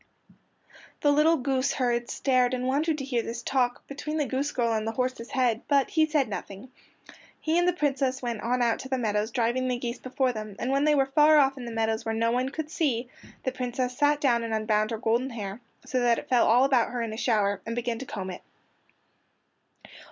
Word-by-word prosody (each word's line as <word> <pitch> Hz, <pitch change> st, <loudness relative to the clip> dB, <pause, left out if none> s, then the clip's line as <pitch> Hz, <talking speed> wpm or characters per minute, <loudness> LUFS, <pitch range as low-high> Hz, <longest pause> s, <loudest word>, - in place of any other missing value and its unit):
The 290 Hz, -, +4 dB
little 310 Hz, +3 st, +4 dB
goose 265 Hz, 0 st, 0 dB
herd 240 Hz, -2 st, 0 dB
stared 255 Hz, -2 st, +1 dB
and 250 Hz, 0 st, -3 dB
wondered 300 Hz, +4 st, +1 dB
to 275 Hz, -, -4 dB
hear 245 Hz, -3 st, 0 dB
this 235 Hz, +1 st, -6 dB
talk 250 Hz, -2 st, 0 dB
between 300 Hz, +2 st, -5 dB
the 300 Hz, -, +1 dB
goose 275 Hz, +2 st, -2 dB
girl 235 Hz, -4 st, 0 dB
and 220 Hz, 0 st, -1 dB
the 225 Hz, -, -2 dB
horse's 250 Hz, -1 st, -2 dB
head, 245 Hz, -4 st, +1 dB
but 280 Hz, -2 st, +2 dB
he 315 Hz, -1 st, +3 dB
said 295 Hz, -4 st, +1 dB
nothing. 200 Hz, +3 st, -7 dB, 0.7 s
He 315 Hz, +1 st, -1 dB
and 350 Hz, -, +2 dB
the 360 Hz, -, +3 dB
Princess 275 Hz, -4 st, 0 dB
went 235 Hz, -4 st, -4 dB
on 245 Hz, +1 st, 0 dB
out 230 Hz, -1 st, +1 dB
to 265 Hz, -, -8 dB
the 260 Hz, -, 0 dB
meadows 215 Hz, -2 st, 0 dB
driving 245 Hz, +2 st, 0 dB
the 250 Hz, -1 st, 0 dB
geese 240 Hz, 0 st, -4 dB
before 255 Hz, 0 st, -1 dB
them, 215 Hz, -2 st, -7 dB
and 255 Hz, -, -2 dB
when 275 Hz, +2 st, +2 dB
they 300 Hz, -1 st, +4 dB
were 270 Hz, -1 st, +3 dB
far 300 Hz, +3 st, +5 dB
off 275 Hz, -2 st, +4 dB
in 255 Hz, -3 st, -8 dB
the 235 Hz, -, -6 dB
meadows 225 Hz, -1 st, -1 dB
where 225 Hz, 0 st, -2 dB
no 230 Hz, +1 st, +1 dB
one 250 Hz, +2 st, 0 dB
could 310 Hz, +2 st, -5 dB
see, 250 Hz, -8 st, -1 dB, 0.3 s
the 260 Hz, -, -1 dB
Princess 250 Hz, 0 st, -3 dB
sat 290 Hz, +2 st, +2 dB
down 245 Hz, -5 st, +2 dB
and 225 Hz, -1 st, -2 dB
unbound 215 Hz, -1 st, +1 dB
her 225 Hz, -, -3 dB
golden 230 Hz, +4 st, 0 dB
hair, 210 Hz, -2 st, -6 dB, 0.2 s
so 255 Hz, -, -1 dB
that 240 Hz, -1 st, +3 dB
it -, -, -7 dB
fell 250 Hz, -2 st, +4 dB
all 245 Hz, +4 st, +5 dB
about 260 Hz, -4 st, +2 dB
her 245 Hz, -1 st, -3 dB
in 225 Hz, -1 st, -4 dB
a -, -, -6 dB
shower, 205 Hz, -5 st, +1 dB
and 230 Hz, -, -4 dB
began 240 Hz, -1 st, -2 dB
to 265 Hz, -, -6 dB
comb 190 Hz, -4 st, -5 dB
it. 180 Hz, -, -9 dB
250 Hz, 225 wpm, -27 LUFS, 230-275 Hz, 0.7 s, far